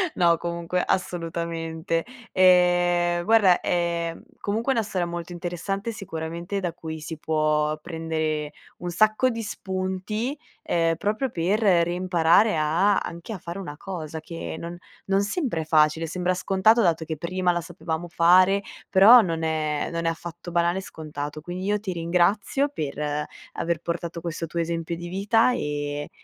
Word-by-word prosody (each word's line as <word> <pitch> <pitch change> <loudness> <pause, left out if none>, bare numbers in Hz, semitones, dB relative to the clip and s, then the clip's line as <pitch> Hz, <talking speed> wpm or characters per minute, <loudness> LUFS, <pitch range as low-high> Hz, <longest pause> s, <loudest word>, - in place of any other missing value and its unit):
No, 170 -2 +4
comunque 170 +1 -2
assolutamente. 165 -1 -2 0.3
Ehm, 175 -1 +4
guarda, 205 -5 +5
ehm, 170 -1 -1 0.2
comunque 225 +6 -1
una 230 - +1
storia 185 -4 -2
molto 170 0 -6
interessante, 185 +5 -3
sicuramente, 170 -1 -5
da 175 -3 -2
cui 160 -2 -7
si 160 0 -6
può 155 -1 +1
prendere 160 -2 -3 0.2
un 175 - -5
sacco 215 +7 +3
di 230 -1 -4
spunti, 200 +6 -3 0.3
ehm, 165 -1 +1
proprio 215 +8 -1
per 185 +4 0
reimparare 175 0 +3
a 170 +7 +3
anche 170 +7 -5
a 200 - -5
fare 170 +4 -6
una 145 -6 -6
cosa 160 -5 -6
che 165 0 -6
non 170 +1 -6 0.3
non 195 +1 +3
sempre 210 - -1
è 155 - -6
facile, 155 +1 +3
sembra 180 +2 0
scontato 195 +5 +3
dato 165 -4 +2
che 160 -1 -4
prima 180 +2 0
la 175 - -1
sapevamo 165 +1 -5
fare, 185 +3 +5 0.3
però 215 +5 +9
non 165 -4 -2
è 155 -2 -1
non 170 0 -3
è - - +3
affatto 170 +1 -7
banale, 175 +2 +2
scontato. 150 -3 -6
Quindi 180 +3 -5
io 210 +1 +1
ti 195 -3 -4
ringrazio, 180 +11 +1
per 150 - -3 0.3
aver 170 -1 -1
portato 170 0 -4
questo 165 0 -4
tuo 170 +2 -4
esempio 165 0 -2
di 175 +1 -7
vita 210 +6 +3
e 145 -6 -3
175 Hz, 150 wpm, -25 LUFS, 165-190 Hz, 0.3 s, però